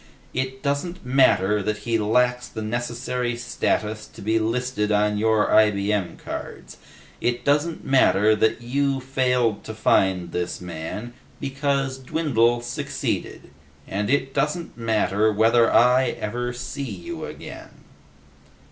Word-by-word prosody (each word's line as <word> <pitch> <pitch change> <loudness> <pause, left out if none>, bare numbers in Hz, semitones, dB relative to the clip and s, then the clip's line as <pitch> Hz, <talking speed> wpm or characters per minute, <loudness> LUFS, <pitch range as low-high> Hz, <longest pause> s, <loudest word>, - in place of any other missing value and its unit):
It 130 0 -3
doesn't 145 +4 -2
matter 105 -6 +3
that 105 +2 -1
he 115 -1 +1
lacks 125 +3 +1
the 110 - -6
necessary 120 +2 -2
status 110 -2 -2
to - - -16
be 110 +2 +2
listed 115 -1 -1
on 105 0 +2
your 110 -1 +2
IBM 105 -3 +2
cards. - - -8 0.4
It 120 0 -1
doesn't 150 +3 +1
matter 110 -5 +4
that 110 +2 +1
you 135 +2 0
failed 125 -4 0
to 110 - -6
find 95 -5 +2
this 90 0 -3
man, 90 +7 -6 0.3
because 135 -1 -1
Dwindle 125 -4 +1
succeeded. 120 0 -4 0.4
And, 105 +2 -2
it 135 -1 +1
doesn't 160 +4 -1
matter 110 -2 +1
whether 115 +2 +4
I 125 +2 +5
ever 120 +3 -3
see 125 +3 -6
you 100 -10 -6
again!" - - -10
120 Hz, 125 wpm, -23 LUFS, 105-130 Hz, 0.4 s, I